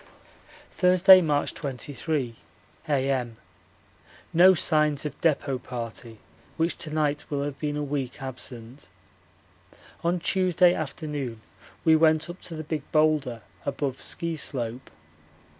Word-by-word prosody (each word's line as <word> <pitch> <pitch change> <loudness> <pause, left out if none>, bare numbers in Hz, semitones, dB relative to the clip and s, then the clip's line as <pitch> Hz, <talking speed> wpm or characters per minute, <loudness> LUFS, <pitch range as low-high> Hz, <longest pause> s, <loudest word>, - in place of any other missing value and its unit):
Thursday, 185 +1 +7
March 150 -4 0
23, 140 -1 -3 0.5
A.M. 130 -5 0 1.0
No 185 +3 +7
signs 150 -3 +2
of 150 - -6
depot 140 -5 +1
party, 115 -2 -7 0.4
which 165 +1 +1
to 170 -2 -6
night 150 -1 0
will 140 -1 -1
have 145 -1 -5
been 150 -1 -2
a 150 - -2
week 140 -3 -3
absent. 130 -1 -8 1.2
On 175 +1 +1
Tuesday 180 0 +3
afternoon 145 -6 -4 0.5
we 160 -1 +6
went 160 +1 +3
up 175 - -14
to 165 - -8
the 155 - -5
Big 155 0 -3
Boulder 150 -7 +2 0.2
above 140 -2 -3
Ski 170 -1 -2
slope. 125 -4 -4
150 Hz, 120 wpm, -26 LUFS, 130-160 Hz, 1.2 s, Thursday